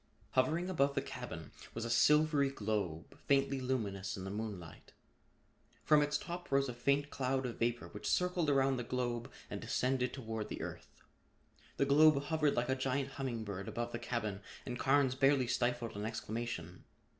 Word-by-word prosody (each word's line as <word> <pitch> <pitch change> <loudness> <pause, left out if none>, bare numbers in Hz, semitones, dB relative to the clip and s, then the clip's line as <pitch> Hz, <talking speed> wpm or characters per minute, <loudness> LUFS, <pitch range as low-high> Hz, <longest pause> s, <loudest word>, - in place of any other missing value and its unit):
Hovering 155 +8 +2
above 140 -6 +2
the - - +2
cabin - - -7 0.2
was 115 0 -3
a - - -3
silvery 150 +2 +4
globe, 105 - -3
faintly 135 -1 +3
luminous 100 -7 -2
in 95 - -6
the 95 - -4
moonlight. 100 -6 -6 0.9
From 150 -1 +5
its 145 0 +1
top 175 +1 -7
rose 140 0 +3
a 125 - -4
faint 140 +4 +1
cloud 130 0 0
of 120 - -5
vapor 120 0 0
which 105 0 -5
circled 180 -3 +2
around 135 -1 +3
the 125 - -2
globe 120 -1 -2 0.2
and - - -5
descended 125 0 0
toward 110 -5 -4
the - - -4
earth. - - -9 0.7
The 140 - +3
globe 150 +1 +6
hovered 150 -1 +1
like 120 - 0
a - - +4
giant 130 +1 -1
humming 130 -5 -3
bird 100 -2 -5
above 120 0 -3
the 120 - -4
cabin 110 -4 -3 0.2
and 125 -1 -4
Carnes 135 -1 +3
barely 135 0 +4
stifled 120 -1 0
an 105 +1 -3
exclamation. 110 -6 -4
130 Hz, 170 wpm, -35 LUFS, 115-140 Hz, 0.9 s, globe